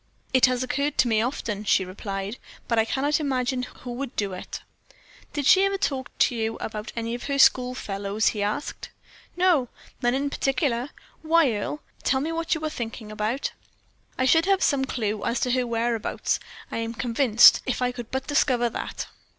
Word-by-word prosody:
"It 260 0 +6
has 255 0 0
occurred 280 +3 -1
to - - +4
me 220 -2 +2
often," 225 -4 -3
she 195 -2 +3
replied, 195 +3 -5 0.3
"but 230 -1 +2
I 220 - +3
cannot 285 +5 +1
imagine 260 -3 0
who 250 0 -8
would 260 +1 -5
do 200 -2 -1
it." 185 - -7 0.7
"Did 290 -2 -2
she 380 +7 +6
ever 390 0 +1
talk 275 -9 -2
to 245 - +3
you 225 0 -1
about 215 0 -5
any 230 0 -3
of 240 - -5
her 280 -1 -1
school 255 -2 +5
fellows?" 200 0 -1
he 210 - -3
asked. 210 +7 -3 0.5
"No, 345 -9 +3 0.3
none 240 0 +2
in 280 +1 -1
particular. 265 -2 0 0.3
Why, 320 -4 +4
Earle, 215 +8 -4 0.2
tell 265 - +2
me 310 +4 -2
what 330 0 0
you 315 0 -4
are - - 0
thinking 225 -4 -6
about?" 215 +5 -2 0.7
"I 255 - +1
should 325 +7 +4
have 390 -1 +3
some 270 -2 +2
clew 215 -5 -2
to 250 0 0
her 250 0 +1
whereabouts, 230 -1 -1 0.3
I - - -3
am 230 0 -3
convinced, 235 -1 +5
if 260 - -1
I 250 0 +1
could 240 -2 -8
but 265 0 -3
discover 250 -5 +2
that." - - -5
250 Hz, 185 wpm, -25 LUFS, 225-280 Hz, 0.7 s, It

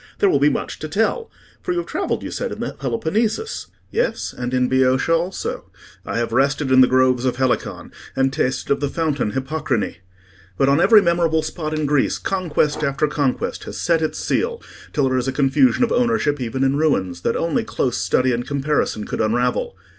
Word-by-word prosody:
There 400 -2 +3
will - - +3
be - - +5
much - - -4
to - - -5
tell; 465 -2 0 0.3
for 355 - -2
you - - -3
have 350 - -1
travelled, - - -2
you - - -5
said, - - -3
in - - -6
the - - -3
Peloponnesus?" 220 - -2 0.2
"Yes; - - -1
and 125 0 -4
in 125 -1 +2
Boeotia 130 +4 +2
also: 170 +3 -2 0.4
I - - -2
have 115 -1 -1
rested 135 +2 +1
in 130 0 +7
the 130 - +7
groves 130 -1 +3
of 130 -2 0
Helicon, 130 -1 -1 0.2
and 135 0 +1
tasted 130 -2 -1
of - - -4
the 145 -1 -1
fountain 145 -9 -1
Hippocrene. 135 - -2 0.6
But 135 - +3
on 140 +4 +3
every 215 0 +6
memorable 170 -2 +2
spot 155 -2 -4
in 155 - -1
Greece 145 -1 +1
conquest 155 -5 -1
after 140 +1 +1
conquest 145 -3 -2
has - - -7
set 170 -2 +2
its 155 - -1
seal, 470 0 -1 0.3
till 140 -3 +1
there 130 0 +1
is 125 - -3
a - - +1
confusion 140 - +3
of 235 - +1
ownership 225 - +1
even 125 +2 -2
in 135 +1 +2
ruins, 95 - 0
that 115 - 0
only 170 +8 0
close 130 - -1
study 110 +8 +2
and 120 +1 -3
comparison 140 -6 -1
could - - -3
unravel. 120 -2 0
140 Hz, 200 wpm, -21 LUFS, 130-165 Hz, 0.6 s, in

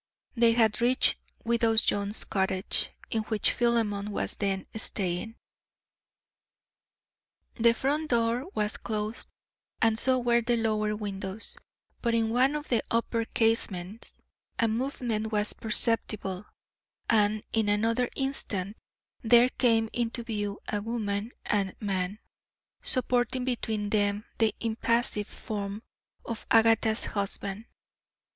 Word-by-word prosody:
They 230 -1 +5
had 225 -2 +2
reached 250 +2 +3 0.3
widow 230 -1 +2
Jones's 205 -1 +2
cottage 190 -1 0 0.2
in 225 - +1
which 215 -2 +1
Philemon 220 -4 0
was 205 - -1
then 195 -2 -1
staying. 200 0 -2 2.2
The 230 0 +5
front 295 +5 0
door 235 +3 +1
was 210 0 0
closed, 215 +1 -3 0.5
and 225 0 +3
so 260 +1 +4
were 240 -1 +2
the 240 +1 +1
lower 215 -2 0
windows, 200 0 -4 0.5
but 235 -1 +1
in 225 -1 +1
one 260 +5 +3
of 300 0 -4
the 235 - +2
upper 230 0 0
casements 225 -4 -1 0.5
a 230 - +3
movement 225 -2 -2
was 210 -1 0
perceptible, 215 -3 0 0.6
and 210 -1 +3
in 220 -2 +2
another 230 +4 +1
instant 215 -7 -3 0.4
there 240 +1 +6
came 225 -3 +2
into 235 0 -2
view 205 -3 -3
a 205 - -1
woman 215 -1 -2
and 200 -2 0
man, 195 -1 -2 0.6
supporting 250 0 +1
between 220 -4 -2
them 205 0 +1
the 225 -2 +2
impassive 230 -2 0
form 205 0 -5 0.4
of 230 -2 -6
Agatha's 225 -1 +4
husband. 200 +1 -3
225 Hz, 115 wpm, -28 LUFS, 205-235 Hz, 2.2 s, there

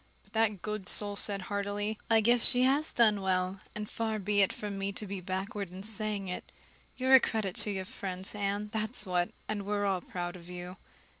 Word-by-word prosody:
But - - -27
that 220 -4 +1
good 210 -2 -4
soul 205 -1 +1
said 200 -1 0
heartily: 205 +2 -3
"I 225 -1 +5
just - - -5 0.2
guess - - +6
she 250 0 +7
has 280 +4 +2
done 215 -4 +3
well, 185 0 -1 0.2
and 210 0 -4
far 220 0 -2
be 205 0 +1
it 195 - +3
from 205 -2 -6
me 195 0 -2
to 210 - -3
be 195 -1 -5
backward 190 +2 -4
in 185 +1 -8
saying 215 -2 -1
it. 180 - -4 0.5
You're 260 +1 +2
a 265 - +11
credit 215 -6 -2
to - - +8
your 190 -2 -3
friends, 185 0 -2
Anne, 205 0 -2
that's 220 0 +1
what, 180 -1 0 0.2
and 205 -2 -3
we're 205 0 -1
all 190 -2 0
proud 175 0 -5
of 175 -1 -12
you." 180 +1 -8
205 Hz, 215 wpm, -30 LUFS, 190-215 Hz, 0.5 s, a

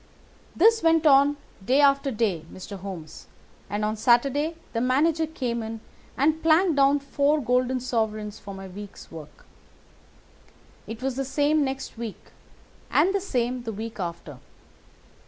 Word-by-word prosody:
"This 450 +5 +5
went 325 -1 +3
on 285 0 +5 0.3
day 260 +8 +2
after 275 -1 +4
day, 215 -9 -1
Mr. 190 +1 -9
Holmes, 180 -5 -9 0.4
and 210 +1 -1
on 215 +1 -1
Saturday 275 +8 +2 0.2
the 230 - -1
manager 310 +6 +2
came 245 -7 -3
in 225 0 -6 0.4
and 310 +4 +2
planked 325 +1 +4
down 275 +1 +5
four 285 +2 +1
golden 255 0 +1
sovereigns 215 -4 -2
for 200 -1 -9
my 195 0 -8
week's 200 +2 -11
work. 155 -2 -12 1.4
It 225 +3 -7
was 265 -1 -2
the 270 - 0
same 290 +3 +1
next 265 -3 -5
week, 230 -4 -7 0.6
and 350 +6 +3
the 400 - 0
same 250 -8 -1
the 230 -2 -5
week 225 +2 -7
after. 170 -6 -6
255 Hz, 145 wpm, -25 LUFS, 215-290 Hz, 1.4 s, This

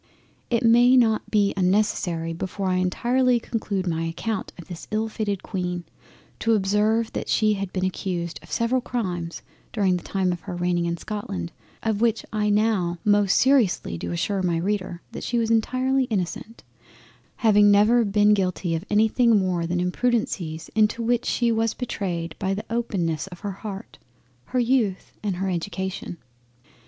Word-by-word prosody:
It 240 +1 +1
may 240 +2 +6
not 225 -3 +2
be 205 -2 +2
unnecessary 180 -4 +1
before 190 +3 -3
I 185 - +1
entirely 240 +7 +2
conclude 215 -4 -3
my 165 -2 -1
account 190 +6 -3
of 175 - -11
this 175 -2 -8
ill 220 +1 0
fated 205 -4 -3
Queen, 180 -3 -3 0.6
to 230 -1 +2
observe 210 +3 +1
that - - -4
she 215 -1 +3
had 195 -2 -4
been 185 0 -1
accused 175 -2 -3
of - - -16
several 240 +2 +1
crimes 180 -9 -4 0.3
during 195 -5 +2
the 175 - -9
time 190 -2 0
of 175 - -3
her 180 +1 -7
reigning 175 -1 0
in 170 0 -2
Scotland, 130 - -5 0.3
of 220 -2 0
which 230 -1 +1
I 210 -1 +1
now 205 -5 +1
most 205 -2 +4
seriously 255 - +3
do 85 +1 -5
assure 190 - -1
my 175 -2 +1
Reader 185 -1 -2
that - - -7
she 240 - -1
was 230 -1 +1
entirely 255 +4 +2
innocent; 215 +1 -4 0.7
having 210 -3 +5
never 210 +4 +5
been 210 0 +4
guilty 185 -3 0
of 165 +1 -2
anything 220 +2 +4
more 180 -3 0
than 175 +1 -1
Imprudencies 180 -5 -1
into 215 +2 +2
which 240 +1 +1
she 235 -1 +2
was 225 0 0
betrayed 175 -9 -3
by 195 0 0
the 210 - -5
openness 195 -9 -1
of 180 -2 -11
her 205 -1 -3
Heart, 200 +1 -8 0.5
her 255 - -1
Youth, 235 -6 0
and 205 -3 -2
her 190 +2 -2
Education. 190 0 -4
200 Hz, 165 wpm, -24 LUFS, 180-225 Hz, 0.7 s, may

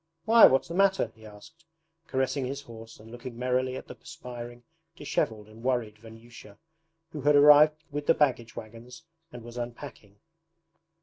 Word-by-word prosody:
'Why, 230 +1 +8
what's 135 - +1
the 170 - -7
matter?' 195 - +2
he 110 -1 -15
asked, 105 +11 -16 0.4
caressing 130 +1 -1
his 140 +2 -6
horse 115 -3 -13
and 110 +1 -15
looking 120 0 -9
merrily 130 +1 -1
at - - -8
the - - -9
perspiring, 120 -6 -10 0.3
dishevelled, 110 -9 -3
and 110 +1 -15
worried 120 -4 -2
Vanyusha, 115 -2 -14 0.5
who 150 - -7
had 145 +2 +3
arrived 150 +1 +6
with 145 0 -5
the - - +5
baggage 125 -6 0
wagons 115 +3 -11 0.3
and 120 -2 -10
was 120 +1 -11
unpacking. 120 -4 -8
125 Hz, 160 wpm, -27 LUFS, 115-145 Hz, 0.5 s, Why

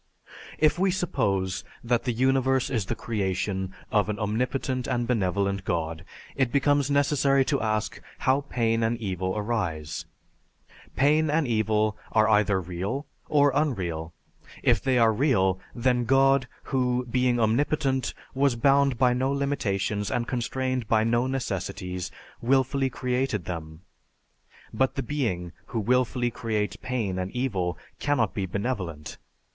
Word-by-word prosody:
"If 155 +3 +3
we 190 +1 +3
suppose 100 - 0 0.2
that 120 0 +1
the 125 - +1
universe 130 +2 +2
is 110 -7 -1
the - - -1
creation 95 -4 -2 0.2
of 105 -1 +2
an 105 - -2
Omnipotent 125 +4 -1
and 120 -1 0
Benevolent 100 -4 0
God, 80 -2 -2 0.3
it 130 -3 +1
becomes 145 0 +2
necessary 140 -1 +3
to 140 -1 0
ask 110 -1 -1 0.2
how 135 +2 +2
pain 115 -1 +1
and 115 +1 +1
evil 95 -3 -2
arise. 95 -9 -2 0.9
Pain 150 +3 +3
and 150 -1 +2
evil 110 -1 +1 0.2
are 110 0 +4
either 105 -3 +3
real 95 - -4 0.2
or 145 -1 +4
unreal. 90 - -1 0.5
If - - +3
they 130 -1 +2
are 115 -2 +5
real 95 -8 +2 0.2
then 125 0 +1
God, 135 +1 +4 0.3
who, 125 -1 +1
being 125 0 +1
omnipotent, 130 +3 +1 0.2
was 135 -1 +2
bound 140 +1 +3
by 125 -1 +4
no 130 +2 0
limitations 105 -8 -1
and 120 -1 -1
constrained 130 0 -2
by 110 0 +3
no 120 +2 +2
necessities, 95 -7 -3 0.3
willfully 135 +2 +2
created 125 -6 -1
them. 80 -2 -6 0.9
But 130 0 +1
the 135 - -2
being 100 - -2 0.2
who 115 - -2
willfully 120 +1 +1
creates 110 -3 -2
pain 110 -8 -2
and 90 0 -2
evil 95 -10 -1 0.2
cannot 135 -8 +1
be 95 -2 -2
benevolent. 90 - -4
120 Hz, 135 wpm, -26 LUFS, 100-135 Hz, 0.9 s, are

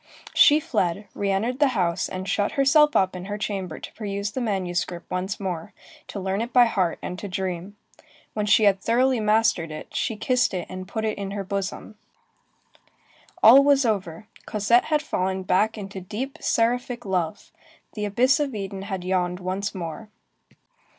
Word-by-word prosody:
She 295 +1 +7
fled, 205 - -1
re 200 - -2
entered 225 +7 0
the 290 - +5
house, 170 -2 0
and 185 +1 -5
shut 205 +1 0
herself 295 +2 +4
up 185 -1 +2
in 180 0 -6
her 205 +1 -4
chamber 195 -5 -4
to - - -9
peruse 200 -1 -4
the 260 - -3
manuscript 180 -5 -2
once 185 +2 -2
more, 180 -5 -4 0.3
to 200 - -6
learn 190 +2 -1
it 235 +2 -4
by 245 -1 +6
heart, 185 -7 0
and 180 - -5
to 205 - -5
dream. 185 +1 -4 0.6
When 210 -1 -2
she 215 - +5
had 195 -2 +4
thoroughly 250 +3 +2
mastered 215 -5 +2
it 155 0 -9
she 225 - -1
kissed 245 -1 +1
it 180 - -3
and 185 0 -7
put 220 +3 -3
it 215 -1 -2
in 200 -1 -4
her 200 - -2
bosom. 200 +2 -5 1.4
All 265 +5 +9
was 280 -2 +4
over, 195 -4 -2 0.2
Cosette 215 +3 +3
had 300 -1 +1
fallen 190 -8 -2
back 210 +5 +1
into 195 -2 -7
deep, 225 +9 -5
seraphic 240 +1 0
love. 180 -2 -2 0.4
The 210 -1 -3
abyss 245 +8 +3
of 280 -5 -1
Eden 195 -1 -5
had 195 -2 -5
yawned 180 -1 0
once 190 +3 -3
more. 185 +5 -6
200 Hz, 175 wpm, -24 LUFS, 185-230 Hz, 1.4 s, All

